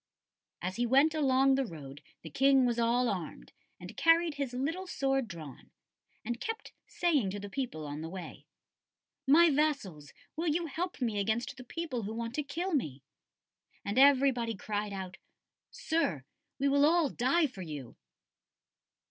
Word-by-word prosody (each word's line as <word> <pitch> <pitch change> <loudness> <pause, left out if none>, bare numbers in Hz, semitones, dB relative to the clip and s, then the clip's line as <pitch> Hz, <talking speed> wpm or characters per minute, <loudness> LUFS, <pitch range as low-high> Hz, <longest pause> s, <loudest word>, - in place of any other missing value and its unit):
"As 185 +2 -3
he 240 0 +1
went 275 +6 +4
along 270 -3 +3
the 270 0 +2
road 145 - -9 0.2
the 160 - -9
King 270 - +4
was 240 -1 0
all 240 +2 +2
armed, 180 -7 -5 0.3
and - - -10
carried 330 0 +4
his 280 -3 -3
little 320 +9 -3
sword 270 -5 0
drawn, 155 -8 -10 0.6
and 240 +2 -3
kept 450 +6 -5 0.2
saying 300 - +1
to 205 +2 -5
the 200 0 -8
people 230 - -4
on 145 +1 -5
the 160 - -5
way: 185 0 -9 0.8
"'My 325 +4 +7
vassals, 270 - -1 0.2
will 330 +2 -2
you 330 +2 +1
help 330 -1 -4
me 220 -4 0
against 220 +4 -1
the 255 - -10
people 275 -2 -4
who 215 +1 -5
want 230 0 -4
to 300 - -1
kill 335 +6 -3
me?' 145 - -2 0.8
"And 200 +5 0
everybody 265 -4 +4
cried 205 +2 -3
out, 190 -1 -6 0.5
'Sir, 210 - -1 0.3
we 280 - +1
will 280 +1 +3
all 325 +1 +4
die 270 +7 +2
for 250 -9 -6
you. 150 -8 -7
250 Hz, 160 wpm, -31 LUFS, 200-290 Hz, 0.8 s, My